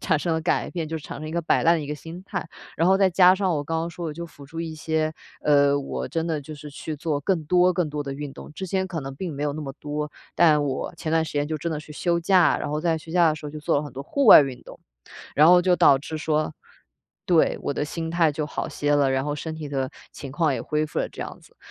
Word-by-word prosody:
产 - - +1
生 165 +2 -1
了 160 - 0
改 - - 0
变， 165 -3 -4
就 160 - -3
产 140 - -8
生 155 - -6
一 - - -6
个 170 +1 -2
摆 160 - +2
烂 170 +1 +5
的 165 - 0
一 - - -6
个 150 - -3
心 165 +5 -9
态， 160 - -5 0.3
然 165 +3 +3
后 190 - +5
再 195 -1 +3
加 180 +1 +6
上 190 -3 0
我 145 - -1
刚 165 +2 -2
刚 165 +1 -3
说 170 0 -6
我 155 - -4
就 170 +2 -6
辅 145 -4 -13
助 165 +3 -9
一 165 -1 -4
些， 155 0 -1 0.3
呃， 145 -1 +4
我 140 - -4
真 165 -1 -2
的 160 -3 -1
就 155 +2 -9
是 150 0 -10
去 150 +2 -6
做 150 -1 -2
更 165 0 0
多 180 +2 +3
更 170 -4 0
多 150 0 -3
的 140 -1 -5
运 145 -1 -6
动， - - -11
之 190 - -5
前 190 +1 -1
可 170 -4 -4
能 135 0 -6
并 165 +1 -5
没 145 - -4
有 145 -1 0
那 155 - -6
么 140 -2 -5
多， 150 0 -4 0.2
但 155 -4 +4
我 140 +5 -3
前 160 0 -4
段 165 0 +3
时 155 - -6
间 145 0 +1
就 155 0 -3
真 170 +3 -3
的 155 - -2
去 150 0 -11
休 170 +3 0
假， 180 +1 +4
然 - - -4
后 150 - -1
在 165 0 +1
休 160 +1 -9
假 175 -2 +5
的 155 - +1
时 150 - -11
候 145 - -5
就 155 0 -8
做 150 - +1
了 145 - 0
很 145 - -8
多 135 - -6
户 275 - -1
外 215 - +11
运 135 -3 -3
动。 - - -13 0.5
然 155 +3 +6
后 180 0 +7
就 180 0 +4
导 140 -5 +6
致 155 +3 -6
说 155 0 0 0.7
对， 170 -3 +3
我 - - -1
的 - - -2
心 165 +1 -4
态 165 -2 +3
就 150 +1 -2
好 - - -4
些 145 0 0
了， 140 -2 +3
然 130 +1 0
后 145 0 -2
身 160 +2 -5
体 155 -1 -6
的 135 -2 -2 0.2
情 140 - -8
况 155 +1 +1
也 - - -3
恢 150 0 -1
复 - - -4
了 - - -1
这 - - -11
样 - - -8
子。 - - -22
155 Hz, 320 characters per minute, -24 LUFS, 145-170 Hz, 0.7 s, 外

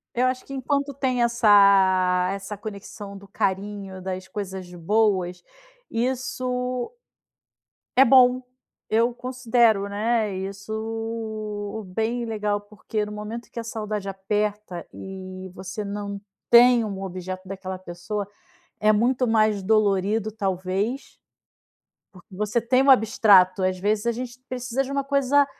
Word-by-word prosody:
Eu 250 - +2
acho 255 0 -2
que 275 - -9
enquanto 280 +1 -1
tem 255 -3 0
essa 195 -5 +5
essa 200 +1 -6
conexão 200 -1 -8
do 200 0 -14
carinho, 195 -1 -3
das 185 0 -5
coisas 190 -2 -6
boas, 180 -1 +1 0.5
isso 250 - -2 1.1
é 265 - +8
bom. 255 0 +6 0.5
Eu 230 +2 +2
considero, 235 -5 +2
né, 215 0 0
isso 220 +1 -5
bem 225 +5 -2
legal 210 -2 -1
porque, 210 +1 -4
no 210 - -8
momento 215 +3 -6
que 235 - -6
a - - -4
saudade 210 -3 -4
aperta 205 -2 -2
e 185 -1 -8
você 190 +3 -6
não 200 0 -5 0.3
tem 240 0 +7
um 195 -2 -4
objeto 185 0 -6
daquela 190 -1 -5
pessoa, 185 +3 -5 0.5
é 215 0 +4
muito 245 +3 +2
mais 215 -2 +3
dolorido 210 +1 +2
talvez, 195 +4 -2 1.0
porque 185 +1 -16
você 210 +4 0
tem 255 +3 +3
um 275 - +5
abstrato. 205 -6 +5
Às 185 0 0
vezes 210 +3 0
a 235 - +3
gente 250 +1 -7
precisa 250 +1 -2
de 270 - -7
uma 275 -1 -1
coisa 280 0 +3
210 Hz, 130 wpm, -24 LUFS, 195-235 Hz, 1.1 s, é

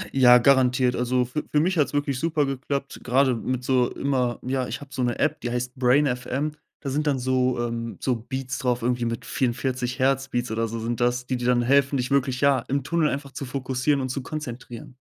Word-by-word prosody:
Ja, 125 -2 +8
garantiert. 125 0 +3
Also, 125 +1 +1
für 125 +5 -4
für 150 - +3
mich 180 +5 +1
hat's 145 - +2
wirklich 145 -2 -1
super 155 -2 +1
geklappt, 135 +1 -4
grade 130 +1 +3
mit 125 +2 -3
so 125 -1 +2
immer 130 -3 0
ja, 130 0 -1
ich - - -5
habe 145 -1 -12
so 130 - -2
'ne 120 -1 0
App, - - 0
die 120 - -3
heißt 125 +1 -3
brain.fm. 130 +2 +1 0.3
Da 140 - -4
sind 150 +3 -1
dann 140 -2 +2
so 130 -1 +1
ähm, 115 0 -4
so 130 - 0
Beats 130 +2 -5
drauf 125 -4 0
irgendwie 120 0 0
mit 115 +1 -3
44 125 0 -1
Hertz 135 0 +1
Beats 120 -2 -2
oder 115 +1 0
so 115 +1 -5
sind 115 +1 -3
das, 120 +1 +1
die 130 0 -2
dir 120 0 -2
dann 125 -1 +3
helfen, 140 +2 +3
dich 125 +1 -2
wirklich, 130 -2 +1
ja, 140 -2 +4
im 140 0 -1
Tunnel 165 +1 +1
einfach 140 0 -4
zu 130 - -6
fokussieren 135 +2 -1
und 130 - -3
zu 135 +2 -3
konzentrieren. 125 -4 -7
130 Hz, 220 wpm, -24 LUFS, 125-140 Hz, 0.3 s, Ja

